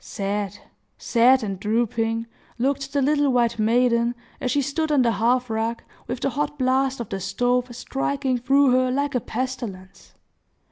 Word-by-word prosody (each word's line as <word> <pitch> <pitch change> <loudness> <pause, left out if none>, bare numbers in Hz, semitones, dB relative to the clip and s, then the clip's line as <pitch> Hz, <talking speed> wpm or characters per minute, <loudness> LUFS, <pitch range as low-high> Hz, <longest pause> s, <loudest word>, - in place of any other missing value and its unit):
Sad, 200 0 -3 0.4
sad 250 +2 +4
and 195 -3 -4
drooping, 225 +1 0 0.3
looked 275 +2 -1
the 280 -1 +1
little 290 0 +2
white 235 -2 +1
maiden, 235 +1 +2 0.2
as 255 - -2
she 285 +2 +1
stood 310 +3 -1
on 280 -4 +4
the 235 - +3
hearth 245 +3 +1
rug, 225 +1 -2 0.2
with 245 +1 -4
the 275 - 0
hot 295 +3 -2
blast 265 0 +1
of 235 - -5
the 195 - -3
stove 245 +6 0
striking 270 0 -2
through 270 +2 +4
her 255 0 +3
like 280 +2 -1
a 250 - +2
pestilence. 220 -7 -6
250 Hz, 160 wpm, -23 LUFS, 230-270 Hz, 0.4 s, sad